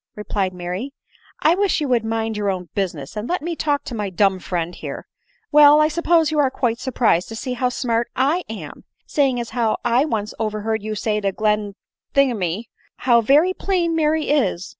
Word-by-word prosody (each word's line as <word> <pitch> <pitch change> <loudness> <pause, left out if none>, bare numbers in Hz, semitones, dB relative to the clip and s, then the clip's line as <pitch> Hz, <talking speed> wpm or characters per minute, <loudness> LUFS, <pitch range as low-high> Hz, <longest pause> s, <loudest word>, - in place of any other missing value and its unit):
?" - - -57
replied 205 -2 -2
Mary; 180 +9 -5 0.2
" - - -30
I 320 - +5
wish 390 0 +1
you 295 - -1
would 240 -3 +2
mind 225 0 -2
your 205 -1 -1
own 180 -3 -4
busi 195 -4 -1
ness, 140 +3 -9
and 210 +2 -4
let 355 -3 -1
me 340 0 -3
talk 290 -2 0
to - - -7
my 210 -3 -3
dumb 190 0 +2
friend 175 -1 -3
here. - - -7 0.5
Well, 295 0 +8
1 305 +1 +3
suppose 330 -1 +2
you 305 - 0
are 280 -2 +4
quite 245 -3 -1
surprised 230 -9 +1
to 225 - -6
see 255 +3 -4
how 250 0 0
smart 235 -1 -1
I 295 +8 +1
am! 190 -10 -8
— - - -47
seeing 270 -4 +1
as 235 -1 -5
how 230 -3 0
I 240 +4 +3
once 215 -8 -3
overheard 220 0 -2
you 215 +1 -4
say 210 +1 -1
to 200 -1 0
Glen 210 0 -1 0.4
thingymy, 225 -8 +1 0.2
* - - -37
how 240 -2 +5
very 295 +10 +4
plain 355 -4 0
Mary 310 -1 +1
is 195 -11 0
230 Hz, 215 wpm, -21 LUFS, 210-290 Hz, 0.5 s, Well